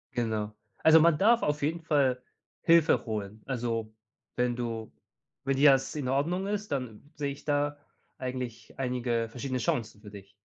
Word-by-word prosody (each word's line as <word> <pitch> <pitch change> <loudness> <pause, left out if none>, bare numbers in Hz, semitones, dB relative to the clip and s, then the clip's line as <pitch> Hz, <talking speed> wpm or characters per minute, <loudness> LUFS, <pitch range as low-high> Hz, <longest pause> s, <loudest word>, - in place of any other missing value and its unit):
Genau. 110 -3 -1 0.3
Also, 160 0 +7
man 165 -1 +5
darf 230 +7 +4
auf 150 0 0
jeden 165 +4 -1
Fall 140 -6 +2 0.4
Hilfe 165 -2 +4
holen. 105 -2 -5
Also, 115 -4 -2 0.4
wenn 125 0 +1
du 115 -2 -4 0.5
wenn 135 - +1
dir 140 0 +8
das 135 +2 +1
in 140 -4 -3
Ordnung 165 +8 0
ist, 210 -2 -3
dann 130 0 -5
sehe 145 -1 -2
ich 140 - -10
da 145 0 0 0.4
eigentlich 125 -3 -6
einige 120 -3 -1
verschiedene 130 +2 -3
Chancen 110 -2 -2
für 105 -1 -11
dich. 100 -1 -12
130 Hz, 160 wpm, -29 LUFS, 115-145 Hz, 0.5 s, dir